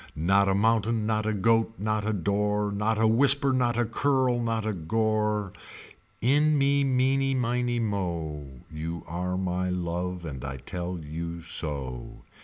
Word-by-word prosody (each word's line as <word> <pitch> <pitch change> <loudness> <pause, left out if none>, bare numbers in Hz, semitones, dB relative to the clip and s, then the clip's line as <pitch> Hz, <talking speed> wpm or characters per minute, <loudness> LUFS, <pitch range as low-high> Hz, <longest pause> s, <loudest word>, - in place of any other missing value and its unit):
Not 95 +5 +3
a 95 - +2
mountain 110 +1 +2
not 110 0 0
a - - +2
goat 115 +2 +2
not 110 +1 -1
a - - +2
door. 105 +1 0
Not 105 +2 0
a 110 - +2
whisper 135 +4 +4
not 120 -2 +1
a 120 - +2
curl 130 +1 +1
not 115 -2 -1
a 110 - -1
gore 105 +2 0 0.7
In 150 +5 +3
me 140 0 +3
meeney 135 +1 +2
miney 120 -1 0
mo. 80 - -3
You 80 +1 -5
are 90 +2 -3
my 90 0 -1
love 90 0 -3
and 65 -5 -6
I 70 -1 -5
tell 90 +7 -5
you 85 +3 -5
so. 70 -7 -4
105 Hz, 155 wpm, -27 LUFS, 85-115 Hz, 0.7 s, whisper